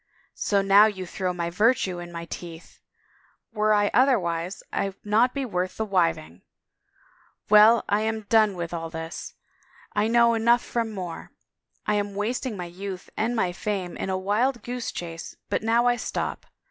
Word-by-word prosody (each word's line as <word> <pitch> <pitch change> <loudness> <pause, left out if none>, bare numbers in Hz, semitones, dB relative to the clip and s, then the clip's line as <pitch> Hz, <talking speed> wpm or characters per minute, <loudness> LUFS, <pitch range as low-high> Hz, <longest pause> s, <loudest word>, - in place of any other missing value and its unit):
" - - -43 0.2
So 200 -1 +3
now 200 +2 +7
you 190 -3 -4
throw 180 +1 -2
my 170 -1 -3
virtue 200 -2 +2
in 175 0 -8
my 170 0 -6
teeth!... 170 0 -9 0.7
Were 215 0 +2
I 205 -1 +3
otherwise 185 -9 +1
Fd 195 -1 -1
not 220 +5 +2
be 275 -1 -1
worth 185 -4 -3
the 220 - -1
wiving!... 165 - 0 1.1
Well, 215 +2 +7
I 205 +1 +2
am 220 0 -1
done 215 -1 +3
with 170 -1 -5
all 165 -1 -4
this. 160 0 -7 0.6
I 210 +1 +1
know 235 0 +4
enough 235 +1 +3
from 230 -2 -2
more. 180 -5 -6 0.6
I 210 - +1
am 205 -1 -1
wasting 225 +2 -2
my 180 - -4
youth 185 +2 -7
and 230 +3 0
my 185 -6 +1
fame 185 -1 -3
in - - -4
a 190 - 0
wild 215 +5 0
goose 245 0 -4
chase 165 -1 -7 0.2
but - - +1
now 230 +2 +2
I 245 0 +3
stop. 225 - -4
205 Hz, 170 wpm, -25 LUFS, 180-225 Hz, 1.1 s, now